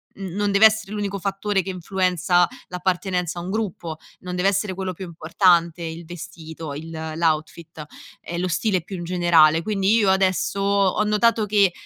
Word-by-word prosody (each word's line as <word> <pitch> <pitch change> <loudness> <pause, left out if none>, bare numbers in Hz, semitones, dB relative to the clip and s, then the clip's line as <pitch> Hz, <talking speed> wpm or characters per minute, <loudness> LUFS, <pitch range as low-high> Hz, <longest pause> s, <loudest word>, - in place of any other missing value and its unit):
n 195 - -7
non 205 0 0
deve 200 +2 +6
essere 220 -2 -3
l'unico 205 -2 -3
fattore 195 +1 -1
che 190 - -4
influenza 180 -1 +1 0.2
l'appartenenza 180 -1 -2
a - - -5
un 175 - -6
gruppo, 190 -6 -3 0.2
non 180 0 -6
deve 180 +2 +1
essere 195 -1 -1
quello 185 -1 -3
più 190 - -8
importante, 170 0 +2
il 165 +1 -6
vestito, 160 -2 -8
il 160 +3 -8 0.2
l'outfit 160 -1 -2 0.4
e 170 - -6
lo 185 - -1
stile 180 +1 0
più 190 +2 -7
in 175 - -6
generale. 170 -2 +4
Quindi 205 +1 +1
io 205 -4 +4
adesso 190 0 +1
ho 200 0 +2
notato 215 +1 +2
che 200 -2 +4
185 Hz, 170 wpm, -22 LUFS, 170-200 Hz, 0.4 s, deve